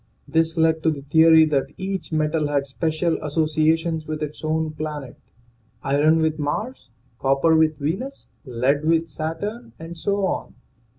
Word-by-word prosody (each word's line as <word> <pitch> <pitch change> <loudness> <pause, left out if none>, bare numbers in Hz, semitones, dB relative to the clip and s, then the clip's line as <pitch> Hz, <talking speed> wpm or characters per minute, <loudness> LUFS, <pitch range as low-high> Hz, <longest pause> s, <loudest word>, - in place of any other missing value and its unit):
This 165 +1 +1
led 160 0 +2
to 160 - +2
the 145 -3 -4
theory 160 +2 +6
that 145 -3 -1
each 190 -2 -4
metal 155 0 0
had 140 -1 0
special 155 +5 -1
associations 155 +1 0
with 155 0 -3
its 150 +1 -7
own 155 0 -1
planet 150 -4 -6 0.7
iron 145 +3 +3
with 155 0 0
Mars, 210 - -4 0.3
copper 135 +4 +3
with 160 -1 +3
Venus, 190 - -4 0.2
lead 135 +2 0
with 165 +1 +2
Saturn, 165 - -5
and 165 +1 -9
so 200 +3 -1
on. - - -3
160 Hz, 145 wpm, -22 LUFS, 150-165 Hz, 0.7 s, theory